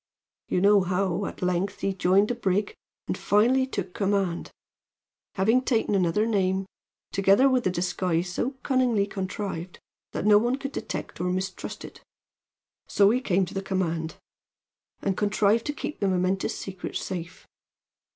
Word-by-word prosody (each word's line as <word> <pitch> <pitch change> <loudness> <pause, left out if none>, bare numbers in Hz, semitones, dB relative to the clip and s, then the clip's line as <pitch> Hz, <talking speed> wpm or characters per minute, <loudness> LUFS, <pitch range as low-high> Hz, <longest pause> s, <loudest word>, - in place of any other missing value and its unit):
You 180 - 0
know 200 0 +6
how, 185 +1 0
at - - -7
length, 180 +2 -1
he 195 - 0
joined 190 +2 +3
the - - +1
brig 205 -3 0 0.3
and - - -1
finally 250 +6 +3
took 190 -8 -4
command, 195 -4 0 0.9
having 220 +6 +3
taken 230 -5 +1
another 190 +2 +2
name, 190 -3 +1 0.5
together 195 +7 +4
with 255 -5 +2
a - - +3
disguise 180 -1 -1
so 260 +8 -2
cunningly 250 -6 +2
contrived 190 -3 -5 0.4
that - - -3
no 210 -1 +7
one 240 +3 +1
could 275 0 -5
detect - - -5
or 180 - 0
mistrust 185 +2 -4
it. - - -12 0.9
So 200 0 +4
he 250 +2 +1
came 190 -6 +1
to - - -10
the 195 - -2
command, 170 -4 -2 0.9
and 195 - 0
he - - -3
contrived 210 +2 +2
to 295 - -1
keep 300 - -5
the 200 - +1
momentous 185 +1 0
secret 190 -2 -6
safe. 175 -2 -5
195 Hz, 155 wpm, -26 LUFS, 185-215 Hz, 0.9 s, no